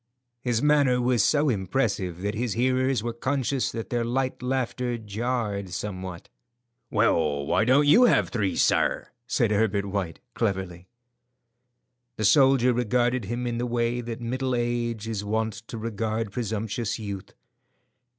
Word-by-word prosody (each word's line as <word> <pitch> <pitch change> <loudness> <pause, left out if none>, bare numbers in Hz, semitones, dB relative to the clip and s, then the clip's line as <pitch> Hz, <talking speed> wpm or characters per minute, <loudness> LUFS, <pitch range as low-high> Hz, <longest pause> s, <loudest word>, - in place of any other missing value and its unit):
His 120 0 0
manner 145 -4 +4
was 120 -3 +2
so 150 0 +3
impressive 95 - -1
that 105 +1 -1
his 115 -1 -2
hearers 130 0 +1
were 120 0 -2
conscious 130 +2 -1
that 115 -1 -6
their 120 -1 +1
light 130 +2 -1
laughter 125 -1 -1
jarred 110 -2 -3
somewhat. 90 -1 -6 0.6
"Well, 75 -3 +1
why 110 - +2
don't 135 +4 +4
you 235 +12 +7
have - - +3
three, 105 -6 -1
sir?" - - +2 0.2
said 120 -4 +1
Herbert 100 -1 +1
White, 95 -6 -3
cleverly. 95 -4 -2 1.3
The 110 - -1
soldier 130 +1 +5
regarded 120 0 +1
him 120 +4 -3
in 120 -1 -2
the 125 - -1
way 120 0 0
that 115 -1 -6
middle 130 +2 -1
age 120 -2 -2
is 110 -3 -3
wont 110 +1 -1
to 115 - -6
regard 110 -1 -2
presumptuous 110 0 -2
youth. 100 -4 -7
115 Hz, 140 wpm, -26 LUFS, 105-125 Hz, 1.3 s, you